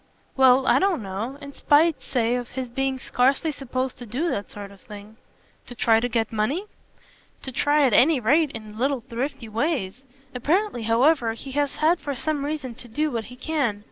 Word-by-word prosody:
"Well, 265 0 +5
I - - +4
don't 380 - +1
know. 205 +8 -5
In 280 0 -9
spite, 310 +3 +3
say, 235 -2 0
of 245 -1 -2
his 255 -2 -5
being 270 +1 -1
scarcely 270 +5 +1
supposed 260 -2 -4
to 245 - -9
do 285 +11 -1
that 200 - -3
sort 200 -1 -9
of 200 - -17
thing." 210 +1 -12 0.5
"To 245 - -9
try 225 -1 +3
to 245 +2 -2
get 225 -1 -1
money?" 265 - -1 0.8
"To 265 - -5
try 290 +3 +2
at 250 - +2
any 285 +5 +5
rate 290 +7 +3
in 215 -3 -9
little 270 0 0
thrifty 250 0 -5
ways. 225 - -2 0.3
Apparently 305 - 0
however 240 0 +3
he 265 +4 -9
has 285 +1 -1
had 330 +3 +2
for 285 -1 -4
some 295 +1 -1
reason 290 -4 -4
to 245 - -10
do 300 +6 -1
what 230 -3 -3
he 250 - -10
can. 260 -6 -1
255 Hz, 195 wpm, -24 LUFS, 230-290 Hz, 0.8 s, Well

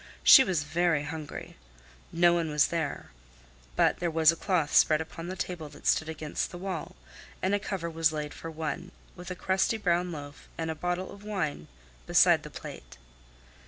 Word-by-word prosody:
She 265 - +10
was 180 - 0
very 165 0 +1
hungry. 150 0 -7 0.5
No 175 0 +4
one 170 -2 0
was 150 -1 +3
there. 165 - -3 0.6
But - - +3
there 175 - 0
was 160 -1 +5
a - - -5
cloth 165 -4 0
spread 155 -1 +5
upon 165 +1 -7
the 185 - -4
table 175 -4 -5
that - - -15
stood 160 - +2
against 155 -1 -3
the 175 - -8
wall, 185 -3 -5 0.4
and 190 +2 0
a 205 - +2
cover 195 -4 -4
was 165 -1 +1
laid 150 -1 -4
for 165 - -8
one, 160 +2 -5 0.2
with 180 0 -9
a 180 - -4
crusty 190 +5 +1
brown 180 -3 0
loaf 145 -2 -9
and 160 -1 -2
a - - -2
bottle 180 +3 -3
of 200 0 -12
wine 165 - -3 0.4
beside - - +5
the - - -9
plate. - - -10
165 Hz, 185 wpm, -29 LUFS, 155-180 Hz, 0.6 s, She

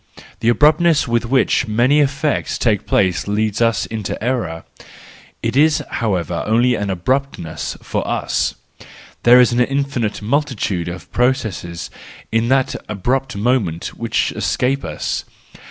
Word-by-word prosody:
The 115 - +1
abruptness 155 +4 +4
with 120 0 0
which 130 0 +2
many 120 +7 +3
effects 140 +1 0
take 105 -5 0
place 95 -2 +1
leads 105 +1 0
us 115 -1 +2
into 110 -3 -4
error; 110 -10 -2 0.8
it - - -1
is 150 +2 +4
however 90 -7 -1
only 120 +3 +3
an 105 -3 -2
abruptness 95 - -2
for - - -3
us. - - -1 0.7
There 120 +1 +7
is 125 -1 +5
an 120 - +1
infinite 135 -4 -1
multitude 110 - -1
of 90 -3 -7
processes 110 -9 -1 0.4
in 115 +1 +1
that 130 +1 +2 0.2
abrupt 125 +5 -1
moment 100 -7 -1
which - - -1
escape 135 +2 -1
us. 75 -2 -3
120 Hz, 130 wpm, -19 LUFS, 100-135 Hz, 0.8 s, There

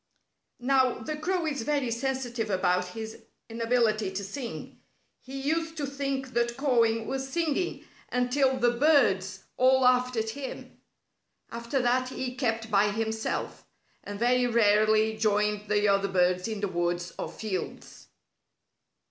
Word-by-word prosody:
Now, 260 0 +2
the 275 +6 -5
crow 345 +3 -1
is 285 -5 -2
very 275 -1 0
sensitive 245 -2 -2
about 180 -1 +1
his 220 0 -6 0.3
inability 225 -3 +1
to 200 +1 -3
sing. 235 +5 -7 0.4
He 270 +1 -7
used 325 +3 -1
to 290 - -1
think 275 -1 -3
that 235 0 0
cawing 230 -5 +2
was 265 +1 -3
singing 335 +3 -1 0.3
until 260 +2 +2
the 240 -1 +3
birds 220 -9 +2
all 260 +1 +4
laughed 250 0 +3
at 220 0 -1
him. 270 +1 -8 0.7
After 235 +3 -2
that 255 +1 +1
he 255 -1 -4
kept 225 -3 -2
by 205 0 +4
himself, 220 +1 -3 0.4
and 205 0 -6
very 245 +2 +2
rarely 215 -1 +3
joined 210 -1 0
the 210 0 +2
other 200 0 +3
birds 180 0 +1
in 215 -2 -4
the 205 - 0
woods 175 -1 -2
or - - -3
fields. 195 -5 -6
235 Hz, 140 wpm, -28 LUFS, 210-265 Hz, 0.7 s, all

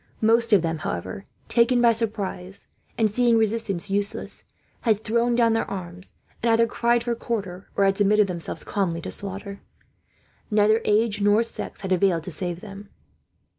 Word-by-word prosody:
Most 230 +1 +3
of 200 -5 +5
them, 165 -1 -2
however, 90 - -5 0.2
taken 245 +1 +3
by 235 -1 +5
surprise, 200 -4 -3 0.3
and 225 - +3
seeing 235 +2 +3
resistance 215 -4 0
useless, 205 +1 -2 0.3
had 220 -2 +1
thrown 235 +2 +1
down 230 -1 +3
their 225 - -1
arms; 180 -1 -8 0.3
and 235 - +1
either 230 +1 +4
cried 235 +1 +1
for 240 0 -1
quarter, 200 -6 -5
or 200 - +3
had 195 0 +2
submitted 210 +1 +4
themselves 175 -3 -5
calmly 185 -5 -1
to - - -6
slaughter. 200 0 -1 0.9
Neither 215 +1 +3
age 210 0 +2
nor 205 +3 +4
sex 230 - -7
had 190 -1 -5
availed 180 -3 +2
to 185 - -7
save 175 +1 -4
them. 200 -1 -10
205 Hz, 165 wpm, -24 LUFS, 190-230 Hz, 0.9 s, of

